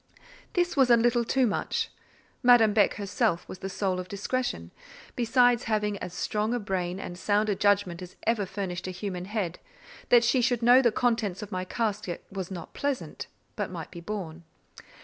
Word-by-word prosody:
This 350 -1 +1
was 265 -3 +4
a 235 - +7
little 240 +1 +3
too 260 +2 +2
much. 210 - -1 0.5
Madame 240 -4 +6
Beck 205 -2 +3
herself 200 -2 -1
was 185 - -8
the 195 - -5
soul 190 -1 -1
of 180 - -5
discretion, 200 - -3 0.4
besides 245 0 +3
having 210 -2 0
as 180 - -6
strong 215 +5 -1
a - - -1
brain 185 -3 -2
and 175 - -6
sound 210 +2 +1
a 205 - +1
judgment 200 -3 +1
as 180 -1 -9
ever 215 -4 +1
furnished 185 -2 -4
a - - -2
human 185 -1 -5
head; 195 -4 -3 0.5
that 240 -1 +6
she 240 +2 +3
should 245 -1 +1
know 245 +2 +7
the 240 -3 +3
contents 225 -5 0
of 205 - -9
my 185 0 -3
casket, 210 -4 -3
was 190 -2 -5
not 175 -4 -8
pleasant, 280 -2 -3 0.3
but - - -2
might - - -7
be 170 - -9
borne. 170 -4 -6
210 Hz, 185 wpm, -27 LUFS, 185-235 Hz, 0.5 s, a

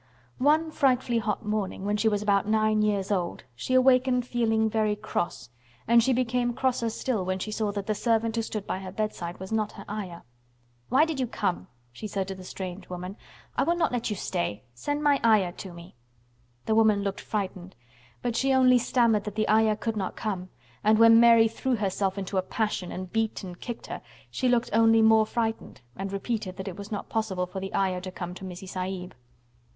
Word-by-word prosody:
One 310 +4 +3
frightfully 255 -5 +2
hot 210 -2 -2
morning, 210 -2 -2
when 205 +1 +1
she 210 +2 +1
was 205 -1 -1
about 200 -1 +2
nine 215 0 +2
years 205 -2 0
old, 180 - -1
she 130 - -2
awakened 255 -1 +4
feeling 225 -3 +1
very 215 -1 +1
cross, 205 - -4 0.4
and 235 +1 +6
she 260 +3 +2
became 245 -1 0
crosser 250 -3 0
still 225 -2 -2
when 185 +1 -1
she 215 +3 -4
saw 215 -1 -1
that 200 -1 -3
the 215 - 0
servant 225 +1 +1
who 230 - +1
stood 215 -2 -4
by 185 - -3
her 190 -1 -7
bedside 185 -4 -4
was 190 +2 -8
not 215 -1 0
her 200 - -10
Ayah. 195 -5 -6 0.7
"Why 270 +6 +5
did 320 -4 -3
you 255 - 0
come?" 195 -5 -2 0.2
she 215 - -7
said 195 -2 -2
to - - -3
the 190 -1 -10
strange 185 0 -7
woman. 180 +2 -6 0.4
"I - - +1
will 340 - +2
not 335 -2 +1
let 240 -2 -1
you 210 - -1
stay. 175 - -3
Send 290 - -3
my 285 -2 +4
Ayah 215 -6 +4
to 190 +1 -9
me." 170 +1 -12 0.7
The 220 - +1
woman 215 -2 +4
looked 200 -1 -3
frightened, 185 -3 -4 0.5
but 240 -2 -1
she 270 +3 +2
only 255 -1 +6
stammered 230 -4 +2
that 210 -1 -5
the 215 0 0
Ayah 215 0 +4
could 225 +1 -3
not 195 -3 -3
come 185 -4 -4 0.3
and 215 +1 +5
when 230 0 +8
Mary 230 -1 +7
threw 250 +3 -1
herself 195 -2 -1
into 190 0 -1
a - - +2
passion 190 -2 -2
and 185 -1 -6
beat 225 -1 -1
and 180 -2 -8
kicked 240 -2 -6
her, - - -6 0.3
she 255 - 0
looked 240 -1 +1
only 225 0 +5
more 220 -1 +5
frightened 225 - -3
and 195 0 -4
repeated 200 -1 -3
that 190 0 -6
it 185 - -5
was 200 +1 -9
not 205 - -4
possible 210 -5 -1
for 180 +2 -6
the 195 0 -5
Ayah 185 -2 +1
to 185 - -6
come 175 -1 -6
to 185 - -10
Missie 185 +1 -7
Sahib. 185 -1 -5
215 Hz, 210 wpm, -27 LUFS, 190-230 Hz, 0.7 s, when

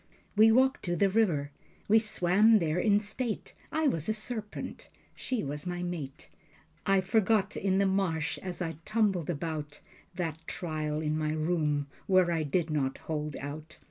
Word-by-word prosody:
We 220 +2 +7
walked 260 +3 +3
to 175 -1 0
the 195 +3 +3
river. 170 -10 +1 0.4
We 220 +2 +6
swam 215 +1 +4
there 165 -2 0
in 205 +1 +4
state. 215 +2 -4 0.2
I 315 -1 +1
was 165 - 0
a 215 - +1
serpent. 215 -1 -6 0.2
She 255 -3 -3
was 145 +4 -4
my 175 0 -3
mate. 155 -6 -5 0.6
I 195 -1 +4
forgot 205 +1 +2
in 190 -1 +1
the 200 - +3
marsh, 190 -5 0
as 180 -1 -4
I 165 -3 -4
tumbled 205 -7 +1
about, 150 -2 -4 0.4
That 165 -3 -3
trial 155 -3 -3
in 155 -1 0
my 155 0 0
room, 155 -2 0 0.2
where 185 -2 +4
I 165 -1 +1
did 160 +2 0
not 135 -3 0
hold 150 -2 -4
out. 150 +3 -7
175 Hz, 165 wpm, -30 LUFS, 155-205 Hz, 0.6 s, We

